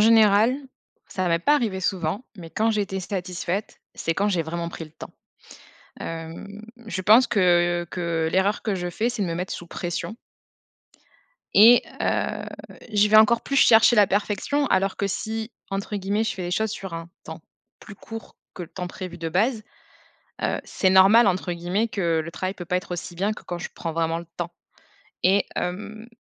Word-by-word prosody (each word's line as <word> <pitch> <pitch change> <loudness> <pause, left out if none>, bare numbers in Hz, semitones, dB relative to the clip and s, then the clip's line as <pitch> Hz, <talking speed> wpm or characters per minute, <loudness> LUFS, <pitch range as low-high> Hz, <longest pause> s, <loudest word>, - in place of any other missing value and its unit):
général, 220 +1 +5 0.5
ça 185 -1 -2
m'est 165 - +2
pas 295 +11 +4
arrivé 205 -7 -1
souvent, 185 +4 -2
mais 165 -3 -9
quand 220 +5 +1
j'étais 200 -3 -1
satisfaite, 180 +1 -4
c'est 165 - -2
quand 205 +1 +1
j'ai 175 -4 +1
vraiment 170 +1 -4
pris 165 - -7
le 155 - -15
temps. - - -10 0.9
Hem, 165 +6 -7 0.2
je 185 -3 -4
pense 225 +6 +6
que 175 -3 +2
que 170 -2 -1
l'erreur 195 +3 +1
que 210 -3 -1
je 175 0 -3
fais, 225 +7 -1
c'est 220 -4 -2
de - - 0
me 165 - -2
mettre 180 +2 -4
sous 175 - -7
pression 175 +6 -4 1.4
et 230 +4 +8 0.2
heu, - - -1 0.5
je 210 0 +4
vais 215 - +6
encore 225 +2 +6
plus 275 - -2
chercher 225 -2 +6
la 205 -2 +7
perfection 210 +9 0
alors 190 +1 +1
que 200 - -1
si, 220 +3 -4 0.2
entre 200 +1 -3
guillemets 200 +3 0
«Je - - -2
fais 185 - -6
les 175 - -3
choses 220 +3 0
sur 195 -4 -6
un 165 0 -6 0.2
temps - - -8 0.4
plus 215 - -11
court 225 +2 -10 0.2
que 180 - -6
le 170 - -8
temps 180 -1 -6
prévu 180 -1 -8
de 165 0 -3
base», 215 +6 +1 0.8
heu, - - 0
c'est 190 - 0
normal, 195 +4 +7
entre 180 -1 0
guillemets 180 +6 -1
que 170 -6 0
«Le 165 - -7
travail 185 +2 -3
peut 175 -3 -8
pas 180 +1 0
être 180 - -8
aussi 175 0 -5
bien 200 +4 0
que - - -12
quand 175 - -5
je 175 - -6
prends 165 -2 -5
vraiment 165 0 0
le 170 - -10
temps», 175 0 -3 0.7
et 195 +2 +4
hem, 210 +5 -4
190 Hz, 190 wpm, -24 LUFS, 175-215 Hz, 1.4 s, et